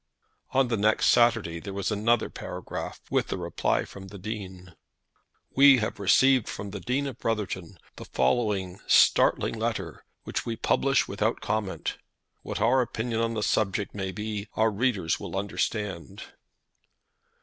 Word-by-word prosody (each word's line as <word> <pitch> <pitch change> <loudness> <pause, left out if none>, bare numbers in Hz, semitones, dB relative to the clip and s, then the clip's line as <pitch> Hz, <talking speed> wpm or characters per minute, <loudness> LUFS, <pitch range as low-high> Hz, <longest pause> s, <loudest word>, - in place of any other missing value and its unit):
On 135 -1 +2
the 115 - 0
next 105 +2 +3
Saturday 110 -8 +3
there 100 +2 -7
was 100 +2 -2
another 110 +2 +2
paragraph, - - -6
with - - 0
a - - -1
reply - - -1
from 95 -1 -11
the 100 - -10
Dean; 95 -3 -7 0.8
"We 140 0 +8
have 110 -3 -2
received 130 +5 +4
from 100 0 -6
the 100 - -5
Dean 130 +7 -1
of 130 -4 -6
Brotherton 100 -5 -3 0.2
the - - -8
following 100 -6 0
startling - - +4
letter, - - -3 0.2
which - - -3
we 115 - -3
publish 135 +4 +2
without 105 +3 -1
comment. 105 -2 -3 0.4
What - - -5
our 120 +5 +4
opinion 115 -1 -2
on 115 0 -1
the 105 - -1
subject 100 -1 0
may 95 -2 -3
be 105 0 -4
our 110 0 +3
readers 105 -7 0
will - - -5
understand. 100 -1 -3
105 Hz, 150 wpm, -27 LUFS, 100-115 Hz, 0.8 s, We